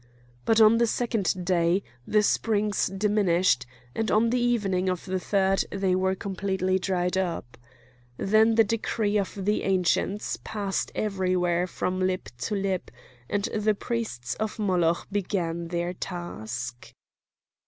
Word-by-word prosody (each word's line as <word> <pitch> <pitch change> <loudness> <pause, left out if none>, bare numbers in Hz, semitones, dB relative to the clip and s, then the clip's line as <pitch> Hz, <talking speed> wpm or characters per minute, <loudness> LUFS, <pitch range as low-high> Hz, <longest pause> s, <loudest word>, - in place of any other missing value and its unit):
But 225 0 +4
on 220 +1 +7
the 235 - +4
second 215 -6 -1
day 175 +1 +2 0.2
the 210 0 +3
springs 210 -1 +1
diminished, 190 - +2 0.3
and 225 0 -1
on 225 +2 +3
the 250 - +2
evening 200 -7 +1
of 180 -2 -3
the 185 -1 -1
third 195 0 +2
they 195 -2 0
were 190 +1 +1
completely 190 -1 -1
dried 180 0 0
up. 170 -9 -3 0.6
Then 220 +3 +4
the 225 - +6
decree 215 -1 0
of 195 - -3
the 210 +1 +1
Ancients 190 +2 0
passed 200 -3 -2
everywhere 185 -3 0
from 185 +1 -2
lip 185 0 -1
to 165 - -2
lip, 195 -2 -1 0.4
and 205 -1 0
the 215 0 +2
priests 200 - -3
of 220 +1 -2
Moloch 180 -5 +1
began 175 -4 -2
their 175 +1 -2
task. 120 - -6
190 Hz, 135 wpm, -26 LUFS, 180-210 Hz, 0.6 s, on